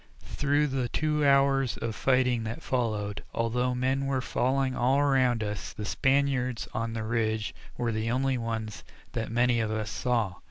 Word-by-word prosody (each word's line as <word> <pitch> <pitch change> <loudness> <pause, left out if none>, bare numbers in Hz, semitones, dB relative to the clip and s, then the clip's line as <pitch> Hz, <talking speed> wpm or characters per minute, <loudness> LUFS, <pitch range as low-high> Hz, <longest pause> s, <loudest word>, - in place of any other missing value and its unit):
Through 145 - +1
the 130 -2 -1
two 150 +3 0
hours 135 -2 +3
of 115 -1 -3
fighting 125 -1 +2
that 110 +1 -5
followed, 105 -5 -1
although 125 +2 0
men 130 +2 0
were 135 -1 +1
falling 130 +1 0
all 130 +3 +2
around 130 -5 +3
us, 105 -1 -4
the 105 - -6
Spaniards 130 +3 +1
on 115 +1 -2
the 110 -1 -3
ridge 110 -1 -1 0.2
were 120 -1 0
the 110 +1 -1
only 130 +2 +1
ones 110 -2 -4 0.3
that 115 - -3
many 120 0 +3
of 110 -1 0
us 110 -1 -2
saw. 115 -8 0
125 Hz, 165 wpm, -28 LUFS, 110-135 Hz, 0.3 s, hours